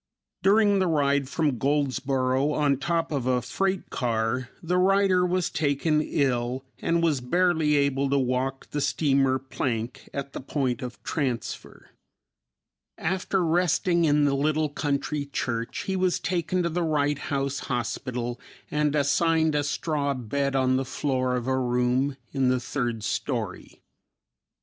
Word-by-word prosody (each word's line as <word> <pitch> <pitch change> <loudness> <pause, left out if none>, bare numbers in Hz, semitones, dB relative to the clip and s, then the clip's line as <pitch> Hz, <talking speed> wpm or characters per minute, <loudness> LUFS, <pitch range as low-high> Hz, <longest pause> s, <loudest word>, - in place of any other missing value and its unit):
During 205 0 +4
the 185 - +2
ride 140 -4 +1
from 145 -6 0
Goldsboro 135 -1 +1
on 145 -3 +2
top 165 +4 -1
of 135 -4 -1
a 125 -1 +3
freight 190 - -2
car, 120 +1 -1
the 180 +2 +1
writer 190 -1 +4
was 180 0 0
taken 150 +1 +1
ill 130 -3 -1
and 170 0 +1
was 150 -6 +2
barely 160 +2 +2
able 140 -1 +1
to 140 - +2
walk 130 +1 -1
the 145 - -1
steamer 135 -3 +2
plank 125 -3 -4
at 140 0 -5
the - - -5
point 135 -1 -1
of 125 -1 -7
transfer. 130 -6 -4 1.1
After 185 +1 0
resting 170 +1 +2
in 145 -1 +3
the 140 - +2
little 155 +2 +1
country 145 0 -2
church 115 -4 -3
he 190 - -2
was 185 -1 +1
taken 180 0 -1
to 170 - 0
the 175 +2 -1
Wright 145 -3 +1
House 140 -1 -2
Hospital 120 0 -3 0.3
and 150 0 +1
assigned 160 +2 +2
a 145 -1 +1
straw 145 -1 -1
bed 135 +3 -2
on 130 -1 +3
the 135 - 0
floor 130 -1 -1
of 125 -2 -2
a 130 0 +1
room 125 +2 +1 0.2
in 135 -2 +2
the 130 0 +2
third 120 -3 -3
story. - - -4
140 Hz, 145 wpm, -26 LUFS, 130-160 Hz, 1.1 s, During